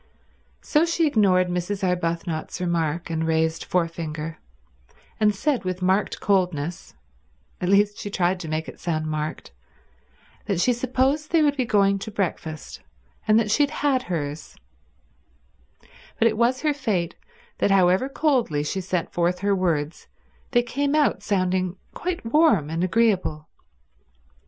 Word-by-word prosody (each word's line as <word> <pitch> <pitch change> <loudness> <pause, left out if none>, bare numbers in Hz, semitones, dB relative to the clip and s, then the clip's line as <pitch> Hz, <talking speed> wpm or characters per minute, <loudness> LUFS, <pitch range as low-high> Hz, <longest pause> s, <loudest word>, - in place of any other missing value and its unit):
So 300 +1 +3
she 335 0 +1
ignored 195 -9 +3
Mrs. 180 +3 -2
Arbuthnot's 170 -2 -2
remark 170 -2 -1
and 160 0 -1
raised 160 0 +1
forefinger, 165 -2 -3 0.8
and 210 -1 +3
said 270 +3 0
with 185 0 -3
marked 190 +3 +1
coldness—at 145 - -3
least, 205 +1 +3
she 205 - -5
tried 185 -1 0
to 170 - -6
make 155 +1 -2
it - - -10
sound 155 -3 -2
marked— 155 - -4 1.0
that 195 -4 0
she 250 +7 +3
supposed 260 +5 0
they 330 -2 +3
would 290 -1 +3
be 260 -3 0
going 200 -3 +3
to 195 - -6
breakfast, 165 -6 -4 0.5
and 215 +1 +5
that 215 -2 0
she 295 - +3
had 285 - +3
had 280 -3 +1
hers; 150 - -5 1.6
but 230 - +4
it 220 - +1
was 240 +3 +1
her 300 -1 +2
fate 210 - -1 0.5
that - - +2
however 190 +5 +3
coldly 255 - +1
she 190 +6 -2
sent 180 -2 -2
forth 175 +1 +1
her 200 0 +2
words 165 -5 -1 0.4
they 240 -2 +3
came 280 +4 -1
out 300 -1 +2
sounding 185 -2 0 0.2
quite 350 -6 -4
warm 225 - +3
and 165 +2 -1
agreeable. 185 -6 +1
185 Hz, 140 wpm, -24 LUFS, 165-230 Hz, 1.6 s, and